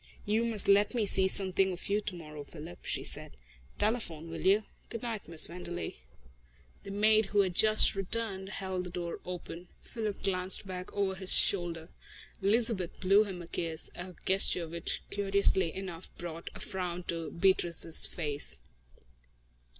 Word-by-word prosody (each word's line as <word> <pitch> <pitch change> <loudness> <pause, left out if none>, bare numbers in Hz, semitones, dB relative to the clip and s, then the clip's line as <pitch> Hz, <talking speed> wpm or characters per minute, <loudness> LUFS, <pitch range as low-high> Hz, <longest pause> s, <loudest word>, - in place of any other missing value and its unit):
"You 215 +3 +1
must 220 -4 0
let 205 +4 +4
me 225 -3 +1
see 190 -1 +5
something 190 0 +1
of 180 - -5
you 205 +1 0
tomorrow, 155 -7 -7
Philip," 160 +3 -11
she - - -2
said. - - -7 0.4
"Telephone, 175 -8 -2
will 165 - -6
you? 205 +3 +4 0.3
Good 230 0 -7
night, 225 -4 -5
Miss 165 -1 +9
Wenderley." 175 0 -6 0.8
The - - -10
maid, 215 +1 +3
who 205 0 +3
had 185 -2 -1
just 215 +4 +6
returned, 195 -1 -3
held 190 -2 -4
the - - -6
door 170 -1 -5
open. 180 -1 -8
Philip 215 -4 -6
glanced 185 0 0
back 185 -1 -7
over 200 -1 0
his 190 0 +5
shoulder. 175 -3 +2 0.5
Elizabeth 205 -3 0
blew 195 +3 +4
him 185 -4 -7
a - - -12
kiss, 165 -2 -1
a 180 0 -8
gesture 190 -3 +3
which 170 +1 -2
curiously 200 -3 +2
enough 185 -2 -7
brought 170 -1 -7
a - - -9
frown 180 -2 -4
to 165 -2 -4
Beatrice's 170 -2 +2
face. 145 - -1
190 Hz, 155 wpm, -30 LUFS, 170-200 Hz, 0.8 s, Miss